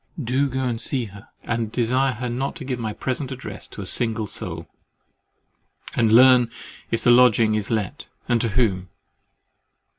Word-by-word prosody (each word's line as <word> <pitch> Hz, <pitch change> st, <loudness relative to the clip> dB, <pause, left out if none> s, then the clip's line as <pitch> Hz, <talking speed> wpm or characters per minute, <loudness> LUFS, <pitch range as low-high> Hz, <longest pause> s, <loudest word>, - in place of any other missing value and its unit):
Do 130 Hz, +4 st, 0 dB
go 130 Hz, +1 st, -3 dB
and 120 Hz, -2 st, -2 dB
see 130 Hz, -4 st, -1 dB
her, 100 Hz, 0 st, -13 dB, 0.2 s
and 115 Hz, -2 st, -2 dB
desire 130 Hz, +3 st, +1 dB
her 125 Hz, +3 st, -5 dB
not 125 Hz, +3 st, -3 dB
to -, -, -7 dB
give 130 Hz, -2 st, -3 dB
my 110 Hz, -2 st, -3 dB
present 130 Hz, +4 st, -4 dB
address 110 Hz, -6 st, -8 dB
to -, -, -9 dB
a -, -, -8 dB
single 115 Hz, +1 st, +2 dB
soul, -, -, -6 dB, 1.3 s
and 115 Hz, -2 st, +2 dB
learn 125 Hz, 0 st, +6 dB, 0.4 s
if 115 Hz, -, -2 dB
the 120 Hz, -, +5 dB
lodging 120 Hz, -3 st, +5 dB
is 105 Hz, -2 st, -2 dB
let, 110 Hz, -5 st, -3 dB, 0.2 s
and 120 Hz, -2 st, +2 dB
to 115 Hz, -, 0 dB
whom. 100 Hz, -5 st, 0 dB
120 Hz, 170 wpm, -22 LUFS, 110-125 Hz, 1.3 s, learn